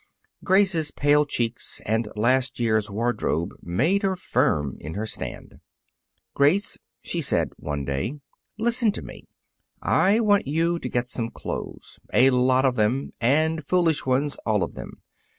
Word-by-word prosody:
Grace's 185 -5 +3
pale 145 +1 +2
cheeks 120 -3 -2
and 110 +1 0
last 125 +4 +1
year's 110 -3 +1
wardrobe 105 -6 -1
made 150 - +1
her 195 -2 0
firm 75 - 0
in 80 +4 -7
her 105 +2 -2
stand. - - -8 0.7
"Grace," 155 +9 +2 0.2
she - - -2
said, - - 0
one 75 -2 -4
day, 70 - -3 0.4
"listen 235 0 +2
to - - -7
me: - - -11 0.5
I 200 +4 +3
want 205 - +2
you 165 +4 0
to 125 - -5
get 120 0 -1
some 115 -2 -3
clothes - - -7
a 130 +2 +5
lot 130 +1 +3
of 125 -2 +1
them, 115 +6 0
and 155 +6 +2
foolish 165 0 +1
ones, 135 +3 0
all 105 -3 +1
of - - -5
them. - - -10
130 Hz, 150 wpm, -24 LUFS, 110-165 Hz, 0.7 s, a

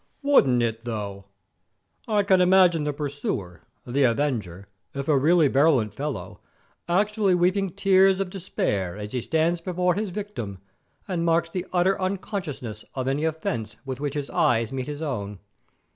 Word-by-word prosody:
"Wouldn't 135 - +4
it, 115 0 -2
though? 100 -4 -5 0.8
I 210 -2 +2
can 190 -2 +4
imagine 180 -4 +5
the 150 - 0
pursuer, 140 - -4 0.2
the 130 +4 -1
avenger, 115 - -1 0.3
if 140 0 -4
a 155 - +4
really 155 +3 +4
virulent 135 -7 +3
fellow, 145 0 -5 0.5
actually 205 +1 +2
weeping 185 +2 +2
tears 190 +1 +4
of 195 -2 -2
despite 100 - -2
as 105 0 -6
he 125 - -2
stands 165 +5 0
before 180 0 0
his 205 +2 -2
victim 180 - -5 0.5
and 180 -4 -1
marks 165 0 +2
the 185 -1 -4
utter 185 +2 +2
unconsciousness 180 - -4
of 130 -1 -2
any 140 +4 0
offence 120 -9 -3
with 130 -1 -5
which 145 -1 -3
his 145 -2 -4
eyes 115 -2 +2
meet 130 -1 -4
his 150 +1 -5
own. 105 -9 -4
150 Hz, 155 wpm, -25 LUFS, 120-185 Hz, 0.8 s, imagine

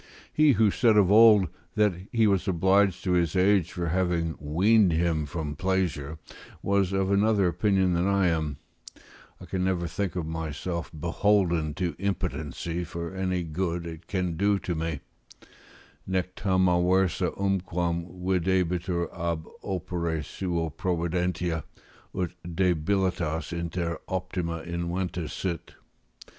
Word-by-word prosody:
He, 150 -2 +5
who 110 -3 +3
said 115 -1 +3
of 100 -2 +5
old, 105 -3 +7 0.3
that 105 -2 +3 0.2
he 115 -2 +3
was 100 -2 +2
obliged 95 +1 +3
to 90 - 0
his 85 -1 +2
age 95 -2 +3
for 85 -1 -3
having 85 -2 0
weaned 95 +7 +3
him 80 -2 +1
from 75 -3 -4
pleasure, 85 -4 -1 0.5
was 100 -1 +2
of 95 0 0
another 100 -1 +3
opinion 95 +1 +2
than 85 +2 +1
I 100 -2 +3
am; 80 -4 -1 0.8
I - - -10
can 95 -1 -2
never 90 -2 0
think 100 +2 -3
myself 80 0 -4
beholden 85 -1 +1
to 90 -4 -2
impotency 85 -3 -3
for 85 0 -6
any 95 -1 -1
good 85 +1 -2
it 80 0 -8
can 90 -4 -2
do 100 +2 +3
to 90 - -3
me: 80 -3 -3 1.1
"Nec 90 -1 -1
tam 95 -2 +2
aversa 90 0 +2
unquam 90 -3 -1 0.2
videbitur 90 -1 0
ab 85 -2 -2 0.2
opere 85 -4 -2
suo 85 -3 -2
providentia, 85 0 -1 0.5
ut 90 -2 -1
debilitas 85 -2 0
inter 85 -1 -3
optima 90 -3 -3
inventa 85 -1 -3
sit." 85 -5 -4
90 Hz, 125 wpm, -27 LUFS, 85-95 Hz, 1.1 s, old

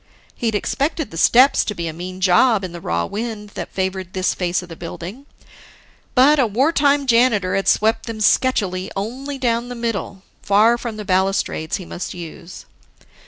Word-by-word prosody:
He'd 225 -3 -2
expected 290 +8 -1
the - - -9
steps 255 - +5
to 210 - -4
be 170 -2 -4
a 160 - -4
mean 185 +3 -7
job 195 +4 +4
in 185 - -5
the 170 0 -9
raw 85 - -1
wind 215 - -5
that - - -7
favored 190 -1 -3
this 185 0 0
face 180 0 -1
of 175 - -13
the 165 - -8
building; 180 - -8 0.9
but 280 +4 +5
a 250 - +4
wartime 280 +4 +2
janitor 230 -6 +3
had 195 - -1
swept 225 +2 +2
them 225 -1 -5
sketchily 200 -5 +1
only 260 +8 -4
down 240 -1 -1
the 245 - -6
middle, 220 -5 -4 0.2
far 215 +4 +4
from 230 -3 -5
the 210 - -6
balustrades 190 -4 0
he 185 - -9
must 175 +2 -6
use. 170 +1 -10
210 Hz, 175 wpm, -20 LUFS, 185-245 Hz, 0.9 s, steps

